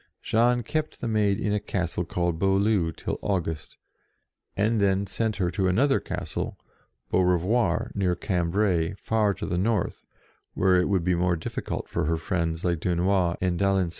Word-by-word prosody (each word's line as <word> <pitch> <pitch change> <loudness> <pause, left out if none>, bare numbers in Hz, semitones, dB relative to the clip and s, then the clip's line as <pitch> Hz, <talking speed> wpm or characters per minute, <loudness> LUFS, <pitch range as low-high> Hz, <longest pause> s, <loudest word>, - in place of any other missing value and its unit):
Jean 120 +2 +2
kept 155 +6 -3
the - - -3
Maid 105 -3 +1
in 105 - 0
a 105 - +1
castle 90 -3 -2
called 85 -1 -1
Beaulieu 95 -2 +2
till - - -5
August, 80 -6 -3 0.8
and 110 +2 +2
then 100 0 +2
sent 110 +3 -1
her 90 -3 0
to 95 0 0
another 135 +10 +3
castle, - - -4 0.5
Beaurevoir, 90 +2 +1
near 95 -3 +1
Cambrai, 90 -1 0
far 105 0 +1
to - - -5
the 90 - -1
north, 105 -1 0 0.5
where 95 -1 +4
it 90 - -1
would 95 -4 +1
be 90 +1 +2
more 90 0 +1
difficult 80 - -4
for - - -1
her 80 +1 +1
friends 80 0 -2
like 85 -2 +1
Dunois 90 +1 +1
and 90 -2 0
d'Alenc. 95 -3 +2
95 Hz, 165 wpm, -26 LUFS, 85-105 Hz, 0.8 s, where